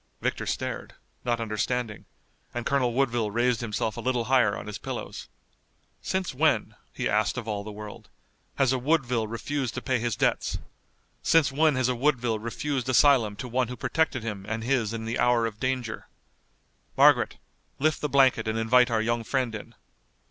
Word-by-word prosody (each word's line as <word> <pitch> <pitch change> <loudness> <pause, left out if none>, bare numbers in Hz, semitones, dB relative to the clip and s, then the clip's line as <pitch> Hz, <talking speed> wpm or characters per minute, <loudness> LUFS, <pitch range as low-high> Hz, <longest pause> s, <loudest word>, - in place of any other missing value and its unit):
Victor - - -2
stared, - - -4 0.3
not 120 -1 0
understanding, 115 0 -2 0.5
and 120 - -3
Colonel 135 -3 +2
Woodville 120 -4 +1
raised 120 +2 +1
himself 110 -1 -2
a - - -4
little 125 -1 0
higher 125 -4 +3
on - - -7
his 105 -1 -6
pillows. - - -6 0.7
"Since 190 -4 -2
when," 155 +4 +2 0.2
he - - -2
asked 105 +3 +1
of 120 -3 -5
all 105 -2 -2
the 105 - -7
world, 105 0 -9 0.5
"has 135 -2 +3
a 130 - 0
Woodville 125 -5 +1
refused 130 +3 -3
to - - -3
pay 130 -3 +1
his 120 -2 -1
debts? - - 0 0.6
Since 160 -5 +4
when 150 +1 +3
has 130 -1 +1
a 125 - +1
Woodville 125 -4 +1
refused 130 +3 -3
asylum 125 -5 +4
to 125 - -6
one 125 +1 0
who 125 +1 -7
protected 155 -7 0
him 105 -4 -4
and 115 0 -2
his 120 -4 +1
in 115 -1 -4
the 115 +1 -2
hour 120 -1 +3
of 110 -2 -5
danger? 130 -3 -2 0.9
Margaret, - - +5 0.4
lift 155 +2 +1
the 150 - -1
blanket 130 -5 +4
and 110 +1 -1
invite 125 +2 +4
our 110 -2 +1
young 120 0 0
friend 125 0 -1
in." 105 - -8
120 Hz, 175 wpm, -27 LUFS, 110-130 Hz, 0.9 s, Margaret